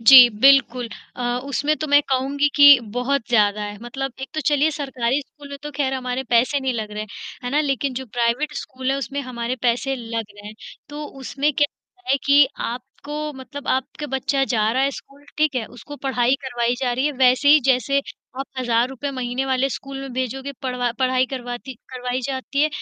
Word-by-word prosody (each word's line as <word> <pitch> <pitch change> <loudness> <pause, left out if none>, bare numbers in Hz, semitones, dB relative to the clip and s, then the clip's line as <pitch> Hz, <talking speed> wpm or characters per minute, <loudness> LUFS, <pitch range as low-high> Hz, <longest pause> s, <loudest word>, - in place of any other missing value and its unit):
जी 250 +1 +10
बिल्कुल 255 -2 +5 0.3
अ, 250 - -5 0.2
उसमें 285 +2 0
तो, 310 - -3
मैं 290 0 +6
कहूँगी 275 +2 +1
कि 285 -1 +10
बहुत 245 +4 -2
ज़्यादा 210 -3 +3
है। 205 0 -5
मतलब 270 +3 -4
एक 265 - -5
तो 310 - -1
चलिए, 295 +1 +3
सरकारी 270 -3 -1
स्कूल 285 +1 -15
में 280 0 -7
तो 295 - -5
ख़ैर 270 -2 0
हमारे 255 0 -2
पैसे 250 +4 +3
नहीं 265 -1 0
लग 215 -2 -4
रहे, 210 0 -4 0.4
है 245 - -2
ना? 290 +3 +2
लेकिन 275 -2 -1
जो 260 +1 -5
प्राइवेट 240 +6 0
स्कूल 260 0 -4
है, 270 - +1
उसमें 275 +2 -3
हमारे 250 -1 -4
पैसे 250 +3 +1
लग 230 -2 -4
रहे 205 0 -12
हैं। 210 - -8 0.3
तो 295 +1 -6 0.2
उसमें 280 +3 0
क्या 290 +1 +3 0.4
है 275 - +5
कि 285 0 +6 0.2
आपको 290 +5 -6
मतलब 285 +1 -9
आपके 265 +3 -1
बच्चा 270 0 0
जा 220 -4 +1
रहा 260 +2 +1
है 275 - +2
स्कूल, 280 +1 -12
ठीक 305 -2 +2
है? 250 -3 -1
उसको 270 +6 -11
पढ़ाई 255 -2 +1
करवाई 240 -2 0
जा 250 -2 +1
रही 260 +4 0
है, 300 - 0
वैसे 255 +1 +4
ही, 300 +1 +8
जैसे 265 +2 +2 0.4
आप 270 - -3
₹1000 255 +3 0
महीने 255 0 -2
वाले 265 0 +1
स्कूल 270 +1 -6
में 270 -1 -7
भेजोगे, 260 +2 -3
पढ़वा 250 -2 -1
पढ़ाई 255 -1 +2
करवाती 245 0 -6 0.2
करवाई 250 0 -3
जाती 275 +1 -1
है, 305 - +4
265 Hz, 195 wpm, -22 LUFS, 245-280 Hz, 0.4 s, जी